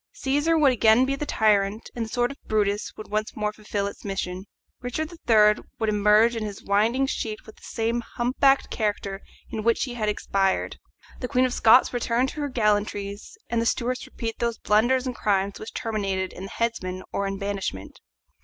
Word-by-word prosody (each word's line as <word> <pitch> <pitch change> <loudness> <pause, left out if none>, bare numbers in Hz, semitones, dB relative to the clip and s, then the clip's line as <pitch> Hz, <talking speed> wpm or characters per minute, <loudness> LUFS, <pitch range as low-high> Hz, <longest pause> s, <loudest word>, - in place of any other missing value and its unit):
Cæsar 290 +4 +1
would 285 -3 +5
again 225 +1 +5
be 275 +1 0
the 295 +2 -5
tyrant, 210 -1 +1
and 235 -2 -2
the - - -9
sword 245 +1 0
of 280 - -10
Brutus 205 -1 0
would 215 - -9
once 215 0 -2
more 210 0 -1
fulfil 210 -1 -3
its 200 - -7
mission. 190 -1 -4 0.4
Richard 300 +6 -3 0.2
III. 210 -1 +5
would 220 - 0
emerge 210 +3 +4
in 225 - -2
his 205 -2 -6
winding 225 +7 +2
sheet 220 -5 -4
with 220 - -14
the - - -21
same 230 +1 -1
humpbacked 270 +3 +2
character 205 -2 -2 0.3
in 220 - -3
which 230 +1 +2
he 250 - -4
had 215 -3 -1
expired, 195 -2 0 0.4
the 250 - -3
Queen 255 -1 +2
of 255 - -1
Scots 240 +3 +5
return 240 0 0
warm 260 - +3
to 300 - -6
her 290 - -2
gallantries, 210 - -1
and 235 -1 0
the 230 - 0
Stuarts 250 +1 -1
repeat 225 -2 -5
those 235 -1 -1
blunders 240 +5 +2
and 255 -2 -3
crimes 200 -1 0
which 215 - -7
terminated 195 -4 -2
in 185 - -7
the - - -8
headsman 185 -6 -2
or 200 - -1
in 195 0 -3
banishment. 195 - -4
220 Hz, 195 wpm, -25 LUFS, 205-245 Hz, 0.4 s, would